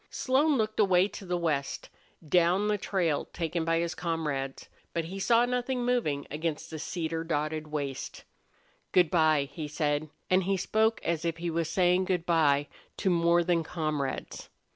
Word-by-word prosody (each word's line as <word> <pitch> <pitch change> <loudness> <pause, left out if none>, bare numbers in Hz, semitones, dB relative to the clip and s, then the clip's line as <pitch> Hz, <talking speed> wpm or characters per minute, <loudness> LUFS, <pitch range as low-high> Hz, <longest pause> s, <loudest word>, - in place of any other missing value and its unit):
Slone 280 +3 +2
looked 215 -1 -1
away 190 -2 +4
to 195 - -9
the 180 0 0
west, 155 -5 -2 0.4
down 180 +5 +3
the 210 -1 +1
trail 175 -7 0
taken 165 0 -3
by 165 0 +1
his 170 0 -1
comrades, 150 -6 -3 0.3
but 165 -1 -1
he 190 +4 -6
saw 235 +4 +4
nothing 250 0 -1
moving 225 -14 0
against 155 +1 -3
that 160 - -5
cedar 165 0 -3
dotted 155 -1 -2
waste. 145 -3 -5 0.7
"Good 180 -4 +4
by," 155 -4 +4
he 155 0 -5
said, 150 0 -1 0.2
and 185 0 +3
he 195 0 +1
spoke 220 +4 +1
as 170 -1 -1
if 165 -1 -1
he 170 0 -3
was 165 -1 -1
saying 180 +1 +3
good 180 -3 -1
by 145 -4 +3 0.3
to 190 - +1
more 170 0 +3
than 170 -1 +1
comrades. 155 -4 -3
170 Hz, 165 wpm, -29 LUFS, 155-190 Hz, 0.7 s, away